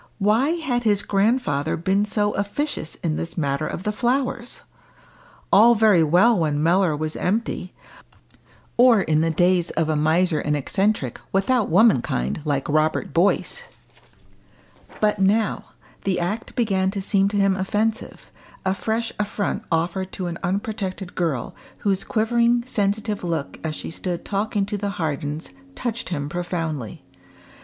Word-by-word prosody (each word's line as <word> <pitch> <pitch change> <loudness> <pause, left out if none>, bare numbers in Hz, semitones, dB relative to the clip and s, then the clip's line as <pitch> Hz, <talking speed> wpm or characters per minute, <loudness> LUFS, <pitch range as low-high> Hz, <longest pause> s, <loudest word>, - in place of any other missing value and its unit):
Why 225 +9 +2
had 275 -8 -1
his 210 -4 +2
grandfather 195 - +1
been 190 +5 +1
so 210 0 0
officious 205 - -3
in 155 -3 0
this 165 +1 -5
matter 140 -1 -1
of 180 - -5
the 210 - 0
flowers? 245 +1 -1 0.9
All 235 +4 +7
very 210 -6 +5
well 185 +8 +4
when 150 -2 0
Mellor 175 -1 +3
was 155 +1 -3
empty, 195 -2 -2 1.0
or 240 -3 +6
in 155 0 +2
the 165 - +2
days 175 +2 +2
of 160 -1 -1
a 155 - +1
miser 160 +2 +2
and 150 0 0
eccentric, 190 - -1
without 215 +4 +1
womankind, 130 - +2
like 140 -2 -1
Robert 155 +1 0
Boyce. 200 - +1 1.4
But 210 -1 +1
now 205 +2 +1 0.4
the 190 -2 0
act 200 +6 -3
began 195 -5 +1
to 200 +1 -3
seem 195 0 +2
to 205 +1 -1
him 195 -1 +3
offensive, 210 +3 -2 0.3
a 190 - +2
fresh 225 +3 -2
affront 205 0 -2
offered 175 +3 -1
to 185 - -4
an 170 -1 -4
unprotected 195 0 -3
girl, 155 -9 -2 0.2
whose 195 -2 0
quivering 235 +2 +2
sensitive 210 -3 -1
look 165 -5 -3
as 155 -1 -3
she - - -6
stood 175 +1 -4
talking 205 0 -1
to 205 0 -4
the 205 0 -2
Hardens 150 -1 -3 0.2
touched 235 -2 -3
him 145 -5 -3
profoundly. 165 - -4
195 Hz, 145 wpm, -23 LUFS, 165-215 Hz, 1.4 s, All